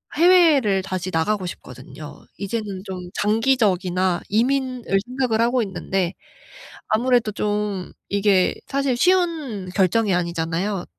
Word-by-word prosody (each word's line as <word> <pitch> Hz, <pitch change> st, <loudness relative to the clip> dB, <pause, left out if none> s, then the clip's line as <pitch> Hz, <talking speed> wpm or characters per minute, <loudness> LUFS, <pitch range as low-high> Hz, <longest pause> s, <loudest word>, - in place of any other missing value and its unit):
해외를 310 Hz, -, +4 dB
다시 185 Hz, -1 st, -4 dB
나가고 185 Hz, +4 st, 0 dB
싶거든요. -, -, -10 dB
이제는 200 Hz, -2 st, -4 dB
좀 190 Hz, -2 st, -6 dB, 0.2 s
장기적이나 195 Hz, -6 st, +1 dB
이민을 250 Hz, -1 st, 0 dB
생각을 250 Hz, -3 st, 0 dB
하고 240 Hz, +1 st, +2 dB
있는데 190 Hz, -2 st, -2 dB, 0.8 s
아무래도 240 Hz, -1 st, +2 dB
좀 205 Hz, -3 st, -2 dB, 0.2 s
이게 200 Hz, -2 st, +2 dB
사실 275 Hz, -2 st, 0 dB
쉬운 310 Hz, -, +1 dB
결정이 200 Hz, +2 st, +2 dB
아니잖아요. 175 Hz, +2 st, -2 dB
210 Hz, 280 characters per minute, -22 LUFS, 185-250 Hz, 0.8 s, 해외를